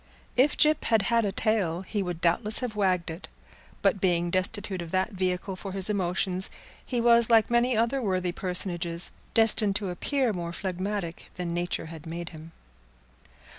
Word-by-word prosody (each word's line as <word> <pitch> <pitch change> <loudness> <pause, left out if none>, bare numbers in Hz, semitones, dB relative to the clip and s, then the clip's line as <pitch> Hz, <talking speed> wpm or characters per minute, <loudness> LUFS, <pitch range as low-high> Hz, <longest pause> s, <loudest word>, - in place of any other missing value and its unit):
If 265 +4 +3
Gyp 305 0 +3
had 225 -3 +3
had 230 -2 +3
a 200 - 0
tail 190 -6 +1
he 205 +1 -3
would 175 -3 -4
doubtless 210 +7 +3
have 245 -4 -4
wagged 185 -5 0
it, 165 +4 -8 0.6
but 195 - +2
being 175 -2 +1
destitute 190 0 -1
of 170 - -7
that 185 +5 0
vehicle 185 0 -2
for 190 0 -7
his 195 +1 +1
emotions, 185 -1 0 0.3
he 245 - -2
was 235 0 +5
like 225 -1 +4
many 240 0 +2
other 235 +4 +1
worthy 185 -4 -1
personages, 175 -2 -2 0.2
destined 215 -3 +5
to 200 -3 -1
appear 255 +6 0
more 170 -2 -5
phlegmatic 185 -1 -4
than 180 -1 -4
nature 175 0 -2
had 160 -1 -10
made 170 0 -5
him. 160 +1 -12
190 Hz, 170 wpm, -27 LUFS, 175-220 Hz, 0.6 s, was